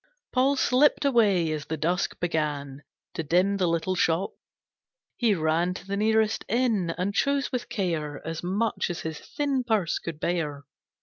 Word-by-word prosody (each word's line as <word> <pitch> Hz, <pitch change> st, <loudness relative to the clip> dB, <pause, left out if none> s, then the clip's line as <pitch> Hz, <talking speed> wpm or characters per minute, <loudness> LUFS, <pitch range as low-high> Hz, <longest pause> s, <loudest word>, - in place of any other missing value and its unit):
Paul 265 Hz, +2 st, +3 dB
slipped 275 Hz, +2 st, +3 dB
away 205 Hz, -, +3 dB
as 150 Hz, -1 st, -3 dB
the 160 Hz, -, -3 dB
dusk 175 Hz, +5 st, -1 dB
began 150 Hz, -5 st, -2 dB, 0.3 s
To -, -, -2 dB
dim 180 Hz, +6 st, +2 dB
the 185 Hz, -2 st, +1 dB
little 165 Hz, +2 st, 0 dB
shop. 175 Hz, +1 st, +1 dB, 0.8 s
He 225 Hz, -4 st, +2 dB
ran 165 Hz, +2 st, +1 dB
To -, -, -8 dB
the 195 Hz, +1 st, -3 dB
nearest 220 Hz, +1 st, +2 dB
inn, 225 Hz, -7 st, +1 dB
and 185 Hz, +3 st, -1 dB
chose 280 Hz, +5 st, +1 dB
with 250 Hz, -2 st, -3 dB
care 160 Hz, -7 st, -2 dB
As 165 Hz, 0 st, -4 dB
much 200 Hz, +6 st, -1 dB
as 175 Hz, -, -4 dB
his 160 Hz, -1 st, -5 dB
thin 280 Hz, -3 st, -1 dB
purse 215 Hz, -8 st, 0 dB
could 165 Hz, -3 st, -6 dB
bear. 150 Hz, -5 st, -2 dB
180 Hz, 165 wpm, -26 LUFS, 160-220 Hz, 0.8 s, Paul